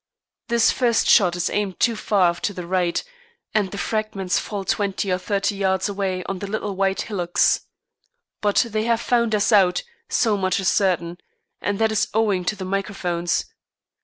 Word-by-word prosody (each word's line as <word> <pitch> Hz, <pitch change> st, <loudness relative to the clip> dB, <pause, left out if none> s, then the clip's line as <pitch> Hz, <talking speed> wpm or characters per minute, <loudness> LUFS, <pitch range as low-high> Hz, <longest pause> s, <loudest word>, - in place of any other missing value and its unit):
This 235 Hz, -1 st, +3 dB
first 240 Hz, -3 st, +1 dB
shot 180 Hz, -6 st, +5 dB
is 175 Hz, -, -1 dB
aimed 200 Hz, -3 st, -2 dB
too 235 Hz, -2 st, +2 dB
far 190 Hz, -5 st, +2 dB
to 185 Hz, +4 st, -3 dB
the 180 Hz, -, -6 dB
right, 175 Hz, -1 st, 0 dB, 0.5 s
and 205 Hz, -3 st, +1 dB
the 200 Hz, -, -7 dB
fragments 205 Hz, -4 st, -1 dB
fall 200 Hz, -2 st, -5 dB
twenty 195 Hz, -1 st, -1 dB
or 180 Hz, -, +1 dB
thirty 200 Hz, +1 st, -1 dB
yards 190 Hz, -1 st, 0 dB
away 195 Hz, -2 st, -2 dB
on 195 Hz, 0 st, -4 dB
the 200 Hz, -, -5 dB
little 205 Hz, -1 st, -3 dB
white 195 Hz, 0 st, 0 dB
hillocks. 180 Hz, -5 st, +1 dB, 0.7 s
But 205 Hz, +3 st, +3 dB
they 215 Hz, 0 st, -1 dB
have 230 Hz, -1 st, +2 dB
found 235 Hz, -2 st, +1 dB
us 205 Hz, +2 st, +1 dB
out, 185 Hz, -4 st, +4 dB, 0.3 s
so 220 Hz, -4 st, +2 dB
much 185 Hz, -1 st, 0 dB
is 190 Hz, -, +2 dB
certain, 175 Hz, -3 st, 0 dB, 0.4 s
and 205 Hz, -1 st, -1 dB
that 220 Hz, +1 st, +2 dB
is 215 Hz, -, +1 dB
owing 205 Hz, -5 st, +1 dB
to 210 Hz, -, 0 dB
the 190 Hz, -2 st, -6 dB
microphones. 185 Hz, -3 st, -1 dB
195 Hz, 175 wpm, -22 LUFS, 185-215 Hz, 0.7 s, shot